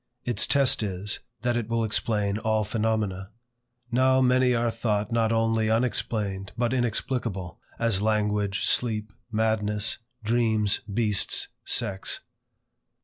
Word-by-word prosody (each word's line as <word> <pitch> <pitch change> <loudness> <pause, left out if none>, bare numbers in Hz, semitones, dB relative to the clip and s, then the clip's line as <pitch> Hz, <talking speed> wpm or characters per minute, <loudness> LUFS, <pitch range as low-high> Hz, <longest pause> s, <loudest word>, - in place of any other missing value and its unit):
Its 120 - +1
test 135 -3 +3
is, 100 0 -2 0.2
that 120 -1 +1
it 115 -2 -2
will 115 0 +1
explain 105 -2 0
all 110 -1 +1
phenomena. 105 -3 -1 0.6
Now 130 +2 +4
many 125 -1 +4
are 115 0 +1
thought 105 -2 -1
not 115 -1 +2
only 115 -1 +2
unexplained 105 -4 -1
but 120 +1 +1
inexplicable; 115 -6 -2 0.2
as 115 -4 +1
language, 105 -2 +1
sleep, 110 -3 0 0.2
madness, 110 -1 0 0.2
dreams, 110 -2 +2
beasts, 105 -2 +1 0.2
sex. 100 -5 -1
110 Hz, 115 wpm, -26 LUFS, 105-120 Hz, 0.6 s, Now